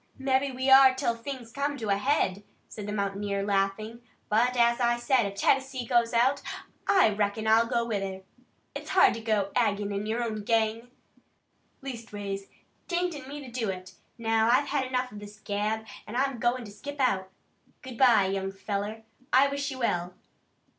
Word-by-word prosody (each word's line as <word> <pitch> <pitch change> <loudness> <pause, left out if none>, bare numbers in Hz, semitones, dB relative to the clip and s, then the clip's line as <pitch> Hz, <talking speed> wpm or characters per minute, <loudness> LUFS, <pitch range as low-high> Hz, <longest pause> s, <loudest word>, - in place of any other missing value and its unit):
"Mebbe 265 0 0
we 260 +1 -2
are 265 -1 +8
'til 260 -3 0
things 240 -1 -7
come 285 +2 -2
to 220 -5 -4
a 200 - +4
head," 205 -4 0 0.3
said 210 -2 -8
the - - -3
mountaineer, 200 -1 -2
laughing, 205 +3 -1 0.3
"but, 245 +4 +2
as 235 0 +4
I 240 -1 +2
said, 240 -2 +2
if 200 - -7
Tennessee 265 +4 +1
goes 235 -1 +2
out, 255 +4 +2 0.5
I 375 - +5
reckon 210 +1 -1
I'll 225 +1 +4
go 235 0 0
with 215 -4 -2
her. 190 -1 -5 0.5
It's - - -7
hard 375 - +5
to 230 - -6
go 210 -3 0
ag'in 205 -2 0
your 230 +2 -1
own 215 -2 -3
gang. 225 +2 0 0.9
Leastways, 205 -6 -6 0.4
't 350 - -2
ain't 355 -2 -1
in 270 -3 -9
me 290 +1 -7
to 250 - -10
do 230 -4 -2
it. 185 -1 -6 0.2
Now 225 -1 +2
I've 270 +4 +3
had 275 -3 0
enough 255 0 -2
of 210 - -9
this 205 +1 -11
gab, 215 +2 -2 0.2
an' 215 - -7
I'm 265 -1 0
goin' 240 +1 0
to 205 - -10
skip 285 +8 -8
out. 195 -8 +1 0.5
Good 255 -3 -9
bye, 235 -6 +6
young 195 0 -2
feller. 205 +3 -4 0.3
I 270 +2 +5
wish 280 +1 -2
you 265 - -6
well." 180 -7 -1
230 Hz, 185 wpm, -28 LUFS, 205-260 Hz, 0.9 s, are